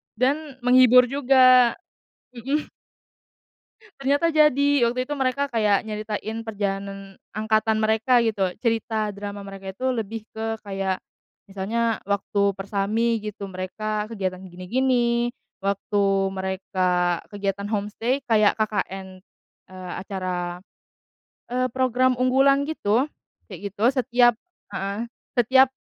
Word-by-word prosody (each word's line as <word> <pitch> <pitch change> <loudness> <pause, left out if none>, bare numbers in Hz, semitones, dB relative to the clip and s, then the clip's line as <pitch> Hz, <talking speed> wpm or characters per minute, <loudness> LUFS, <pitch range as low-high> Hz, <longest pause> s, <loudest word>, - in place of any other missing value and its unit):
dan 275 +4 0
menghibur 250 0 +7
juga, 255 -3 +5 0.6
mhm. 275 +6 -2 1.3
Ternyata 285 +5 +2
jadi, 285 -2 +4
waktu 255 +1 -1
itu 290 - -6
mereka 275 0 0
kayak 210 -3 +2
nyeritain 215 +1 -4
perjalanan 195 -2 -5 0.2
angkatan 220 0 +1
mereka, 220 +3 +2
gitu, 205 -4 +1
cerita 225 -2 -1
drama 200 0 -7
mereka 195 -1 -8
itu 260 +2 0
lebih 225 -1 -4
ke, 225 0 -3
kayak, 195 -2 -3 0.4
misalnya, 215 +4 -1
waktu 200 0 0
Persami, 210 +4 0
gitu, 210 -1 -6
mereka 210 +3 -4
kegiatan 190 -5 -3
gini-gini. 235 +6 +1 0.3
Waktu 195 0 0
mereka 185 -2 0
kegiatan 200 0 -3
home-stay 225 +6 -2
kayak 215 -3 +3
KKN, 195 -3 -3 0.5
eee, 185 -1 -8
acara, 180 -2 -4 0.9
eee, 255 0 +1
program 255 0 +1
unggulan 270 +2 +3
gitu, 255 -5 +1 0.4
kayak 200 - -7
gitu. 205 +3 -2
Setiap 245 -2 +4 0.4
heeh, 200 +4 -3 0.3
setiap, 260 +2 +5
215 Hz, 105 wpm, -24 LUFS, 195-250 Hz, 1.3 s, menghibur